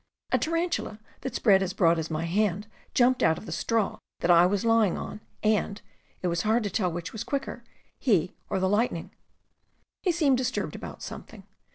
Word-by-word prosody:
A - - +3
tarantula 330 -8 -1 0.2
that 265 - -5
spread 195 -4 +5
as 190 -1 -1
broad 170 -4 +3
as 160 - -3
my 160 +1 -2
hand 200 +2 0 0.3
jumped 250 0 +4
out 160 0 +4
of - - -9
the - - -7
straw 225 -3 0 0.2
that 175 - +3
I 175 +1 +7
was 200 +3 0
lying 225 -5 +3
on 210 - -6 0.2
and 210 -1 +1 0.2
— - - -37
it - - +1
was 170 0 0
hard 220 +2 +2
to 205 - -2
tell 180 -2 0
which 175 +3 -5
was 220 0 -4
quicker, 270 -2 -4 0.4
he 185 - +2 0.2
or - - 0
the 190 - +2
lightning. 210 +5 0 0.9
He 365 - +2
seemed 295 -7 +3
disturbed 255 - -2
about - - -8
something. - - -9
210 Hz, 195 wpm, -27 LUFS, 180-240 Hz, 0.9 s, I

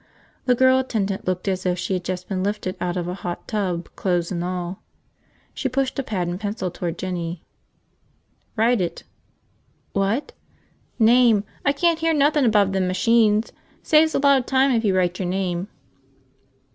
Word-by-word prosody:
The 250 -1 +3
girl 260 +1 +4
attendant 205 -8 -2
looked 185 +1 -2
as 190 -1 -1
if 180 -1 0
she 190 - -2
had 180 -1 -2
just 180 0 -4
been 190 -2 -2
lifted 200 -1 -2
out 180 0 -1
of 175 -1 -2
a 180 - -3
hot 175 -2 -6
tub, 185 -5 -2
clothes 175 -2 -1
and 175 -2 -2
all. 180 0 -4 0.7
She 265 - -2
pushed 270 +1 -1
a - - +2
pad 190 -8 -3
and 175 +1 -4
pencil 205 -3 -3
toward 175 -1 -4
Jinny. 175 -2 -4 1.1
"Write 230 -1 +2
it." 175 - -3 0.9
"What?" 200 +8 0 0.7
"Name. 230 -2 +5 0.2
I 280 - +3
can't 330 +3 +1
hear 325 0 +1
nothin' 295 -1 +3
above 205 -4 +3
them 190 -1 0
machines. 215 +3 +2 0.3
Saves 315 0 +4
a - - +2
lot 280 -1 +5
of 250 - -7
time 265 +1 +3
if 230 -2 +1
you 195 -3 +2
write 180 -1 0
your 185 - -2
name." 180 0 -2
195 Hz, 170 wpm, -22 LUFS, 180-250 Hz, 1.1 s, Name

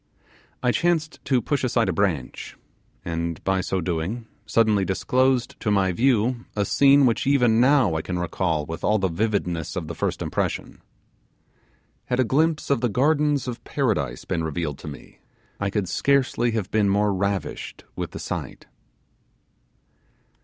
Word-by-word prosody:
I 125 - +3
chanced 165 +1 0
to 130 -3 +2
push 145 -2 -1
aside 120 -2 +2
a - - 0
branch, 90 -10 -2 0.5
and 85 -1 -3
by 95 -1 +1
so 95 0 -2
doing 90 +7 -3 0.2
suddenly 105 -2 +3
disclosed 125 +6 +1
to 105 - -1
my 100 -2 +2
view 120 +2 +1
a 100 -1 +1
scene 140 +3 +5
which 120 +2 +1
even 125 -5 +4
now 130 - +4
I 80 - -1
can 90 +2 -4
recall 85 -3 -1
with 80 +1 -7
all 105 - +3
the 95 -2 0
vividness 90 -4 -1
of - - -3
the - - -5
first - - -2
impression. - - -3 1.2
Had 125 - -1
a - - +5
glimpse 150 +5 +1
of 140 - +2
the 120 - +1
gardens 145 +3 +2
of 120 -1 -5
Paradise 110 - -1
been 80 - -2
revealed 80 -2 -3
to - - -10
me, 70 -2 -10 0.4
I 100 - 0
could 100 -2 -1
scarcely 130 +3 +1
have 105 -4 -2
been 105 -2 +2
more 100 +1 +2
ravished 100 +1 -3
with - - -4
the - - -8
sight. - - -5
105 Hz, 160 wpm, -24 LUFS, 90-130 Hz, 1.2 s, scene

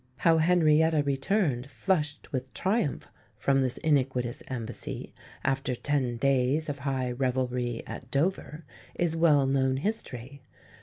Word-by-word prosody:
How 165 +2 +4
Henrietta 160 -2 +4
returned 140 - 0
flushed 150 -4 -1
with 130 -2 -3
triumph 190 - 0 0.3
from 135 -1 +2
this 130 -2 0
iniquitous 130 -5 0
embassy, 120 -3 -5 0.3
after 135 -1 0
ten 130 -3 -1
days 140 +4 +1
of 145 -1 -4
high 130 -2 -1
revelry 125 -2 -1
at 125 - -8
Dover, 155 +2 -1 0.3
is 170 -2 0
well 155 -4 +4
known 130 -1 +1
history. 140 - -4
140 Hz, 120 wpm, -28 LUFS, 130-155 Hz, 0.3 s, How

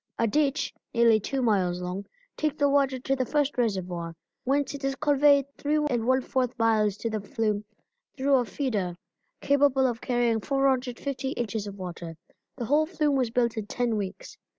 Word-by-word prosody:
A 230 - +2
ditch, 280 +5 +1 0.2
nearly 230 -2 +5
two 265 +5 -2
miles 185 -6 +1
long, 180 +2 -5 0.3
takes 305 -1 -1
the 285 -1 +2
water 275 -2 +2
to 270 +2 -1
the 260 - 0
first 290 +2 0
reservoir, 180 -8 -2 0.3
whence 280 +2 +1
it 285 -1 -8
is 275 0 0
conveyed 285 -1 +4
3 295 +1 0
1/4 260 -2 0
miles 215 -3 +2
to 230 - -3
the 215 -1 -2
flume 210 0 -1 0.5
through 275 +1 +1
a 245 - +1
feeder 210 -9 -2 0.5
capable 280 -2 +3
of 240 -3 -1
carrying 240 -3 +1
450 270 0 -1
inches 220 -3 -3
of 200 0 -8
water. 170 -3 -7 0.4
The 245 - -4
whole 300 +5 +3
flume 300 -4 +1
was 255 -3 +1
built 235 -1 0
in 210 -2 -3
ten 240 -1 -1
weeks. 200 -3 -5
245 Hz, 170 wpm, -27 LUFS, 215-275 Hz, 0.5 s, nearly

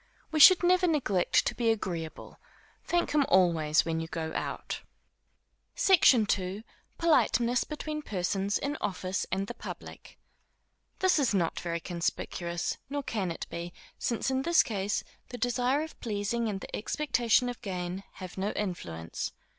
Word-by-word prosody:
We 315 - 0
should 365 +4 +9
never 365 +1 +4
neglect 240 - +2
to - - 0
be 235 -2 0
agreeable. 175 -7 -3 0.4
Thank 345 0 0
him 295 -1 +4
always 165 -5 +4
when 165 -1 -1
you 165 - -4
go 160 -1 -4
out. - - -4 0.9
SECTION 280 - +5
II. 190 +3 -5 0.3
Politeness 245 -6 +3
between 305 0 -5
Persons 195 -2 -1
in 290 +2 -3
Office 185 -2 -2
and 195 +1 0
the 240 - -6
Public. - - -9 0.8
This 375 -4 +3
is 250 -7 +2
not 170 -4 0
very 170 -1 -3
conspicuous; 170 0 -3
nor 285 0 -3
can 205 -8 -2
it 165 - -5
be, 170 +1 -5 0.3
since 240 +2 -1
in 265 0 +1
this 340 +4 +4
case, 205 -1 -2 0.3
the 245 - -6
desire 245 +4 +1
of 320 - -10
pleasing 220 +1 -1
and 195 -2 -4
the - - -6
expectation 245 -1 +1
of 245 -1 -5
gain, 185 -2 -4
have 185 0 -8
no 200 +2 -1
influence. 85 - -4
210 Hz, 150 wpm, -29 LUFS, 180-265 Hz, 0.9 s, should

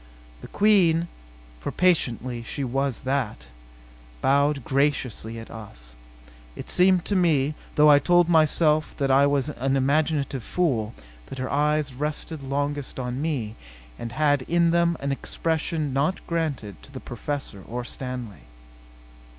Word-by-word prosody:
The - - -9
Queen, 175 -6 +3 0.5
for - - -4
patently 130 -9 +1
she 135 +5 -4
was 135 0 -1
that, 130 - -2 0.7
bowed 140 - +2
graciously 135 -5 0
at 115 - -9
us. - - -10 0.6
It - - -7
seemed 180 -1 +4
to 205 - -1
me 155 -6 +2 0.2
though 150 0 +7
I 145 - +7
told 175 +3 +4
myself 155 -2 +3
that 135 -1 +1
I 140 +1 +5
was 140 0 +1
an 135 -1 -1
imaginative 140 0 +1
fool 125 - -1 0.3
that 135 - -8
her 130 0 -3
eyes 150 -1 +1
rested 150 +3 -4
longest 145 0 -3
on 125 +1 -3
me, 135 -9 -2 0.5
and 115 0 -6
had 145 0 +2
in 170 0 +3
them 170 -1 +2
an 140 0 -1
expression 160 0 -2
not 145 +8 0
granted 150 - -3
to - - -15
the 130 - -7
Professor 130 -5 -5
or 120 +6 -5
Stanley. 125 - -6
140 Hz, 140 wpm, -25 LUFS, 130-155 Hz, 0.7 s, though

